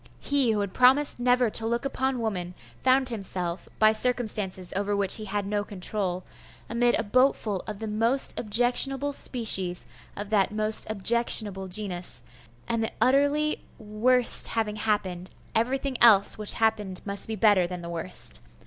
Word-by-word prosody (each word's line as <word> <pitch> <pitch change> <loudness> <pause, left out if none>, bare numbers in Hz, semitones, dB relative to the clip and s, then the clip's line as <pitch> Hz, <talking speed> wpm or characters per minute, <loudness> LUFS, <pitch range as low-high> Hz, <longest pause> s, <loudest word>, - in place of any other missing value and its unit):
He 280 -4 0
who 210 -1 -1
had 200 -2 -5
promised 260 +2 +3
never 245 -1 +1
to 225 - -4
look 235 +3 -2
upon 265 -2 -2
woman 180 -5 -4 0.3
found 260 0 +2
himself, 185 -5 -5
by 215 0 +4
circumstances 215 -6 -1
over 205 +1 -2
which 200 +1 +4
he 215 - -8
had 205 0 -3
no 205 +1 -2
control, 185 -2 -3 0.4
amid 240 +1 +1
a 225 - -2
boatful 225 -3 0
of 210 -2 -6
the 220 - -7
most 230 +5 +1
objectionable 250 +5 +2
species 195 -10 +1 0.3
of 205 +1 -8
that 200 -3 +1
most 215 +1 +2
objectionable 215 -2 +3
genus 180 -2 -2 0.4
and 230 -1 -2
the 220 - -3
utterly 285 +5 +1 0.2
worst 230 +4 +3
having 215 -2 -3
happened, 190 -4 -3 0.2
everything 260 +3 -2
else 215 -4 +6
which 210 -1 -2
happened 215 -4 -1
must 200 -1 -3
be 220 - -4
better 205 -4 +3
than 180 0 -7
the - - -7
worst. 170 +2 -3
215 Hz, 155 wpm, -25 LUFS, 200-245 Hz, 0.4 s, else